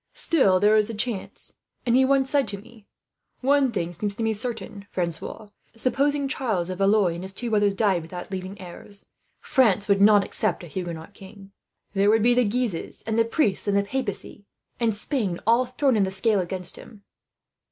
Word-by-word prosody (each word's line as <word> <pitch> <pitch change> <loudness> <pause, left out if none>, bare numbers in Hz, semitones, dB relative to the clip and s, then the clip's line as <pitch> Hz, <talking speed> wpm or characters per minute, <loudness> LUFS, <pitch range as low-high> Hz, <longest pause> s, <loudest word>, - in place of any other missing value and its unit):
Still 200 - +3
there 210 +2 +4
is 215 -1 +3
the 230 - -5
chance; 215 -2 -4 0.3
and 240 -1 +3
he 260 - +5
once 270 0 +3
said 285 -2 +2
to 200 - -3
me: 215 +1 -16 0.5
"'One 275 0 +3
thing 175 -5 -3
seems 200 +3 -3
to 225 - -3
me 225 0 +1
to - - -7
be 205 - -14
certain, 210 -4 -6
Francois: 175 +4 -4 0.3
supposing 280 +4 +1
Charles 215 -10 -1
of 185 - -6
Valois 195 -2 +3
and 170 +2 -6
his 190 +1 -5
two 235 +3 -5
brothers 205 -2 +2
died 195 -4 +2
without 175 +4 -8
leaving 190 +1 -6
heirs, 190 +2 -10 0.4
France 215 -7 +2
would 200 -1 +3
not 205 0 +6
accept - - -2
a - - -8
Huguenot 170 +1 -6
king. 195 0 -13 0.4
There 200 +1 +3
would 220 0 +4
be 245 +1 +5
the 250 0 +3
Guises, 220 -5 -2
and 225 0 0
the - - +6
priests, 225 - 0
and 200 0 +2
the 200 - +2
papacy, 200 -3 -5 0.3
and 230 -3 +1
Spain 205 - -2
all 235 +3 +3
thrown 255 0 +1
in 210 - +2
the 190 - +2
scale 205 +2 +1
against 180 0 -4
him.' 205 -3 -14
205 Hz, 200 wpm, -25 LUFS, 190-235 Hz, 0.5 s, not